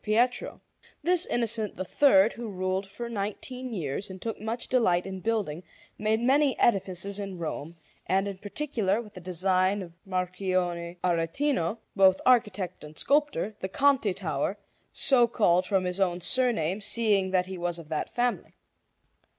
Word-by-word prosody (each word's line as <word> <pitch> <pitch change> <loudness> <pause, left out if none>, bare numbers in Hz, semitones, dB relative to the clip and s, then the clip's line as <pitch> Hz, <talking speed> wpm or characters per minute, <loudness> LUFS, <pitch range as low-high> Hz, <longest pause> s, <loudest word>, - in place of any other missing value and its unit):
Pietro. 235 +4 +1 0.4
This 355 +2 +3
Innocent 230 -3 -1
III, 195 +1 +4
who 235 -1 -6
ruled 185 0 -2
for 205 +5 -7
nineteen 235 +4 -5
years 175 -1 -3
and 190 0 -8
took 225 +1 -5
much 225 +2 -3
delight 180 -9 +2
in 190 -1 -5
building, 200 -7 -1 0.4
made 215 +1 +1
many 270 +3 +3
edifices 195 -2 +1
in 195 -2 -5
Rome; 165 -1 -5 0.3
and 195 +2 +2
in 195 -2 -6
particular, 215 -3 -1
with 215 -3 -9
the 185 - -10
design 185 +2 +1
of 170 -2 -11
Marchionne 180 -2 -1
Aretino, 175 - 0 0.2
both 190 -1 +5
architect 205 -7 +2
and 150 0 -11
sculptor, 285 -7 +1
the 190 - -4
Conti 265 -5 +2
Tower, 160 +1 -2 0.3
so 245 -4 +4
called 185 -6 +2
from 195 -2 +2
his 180 +1 -2
own 180 -2 +1
surname, 205 -3 +1
seeing 205 -3 +1
that 185 -1 +2
he 185 -1 -7
was 175 0 -2
of 165 -3 -11
that 155 - -3
family. 245 0 -1
195 Hz, 150 wpm, -28 LUFS, 180-230 Hz, 0.4 s, both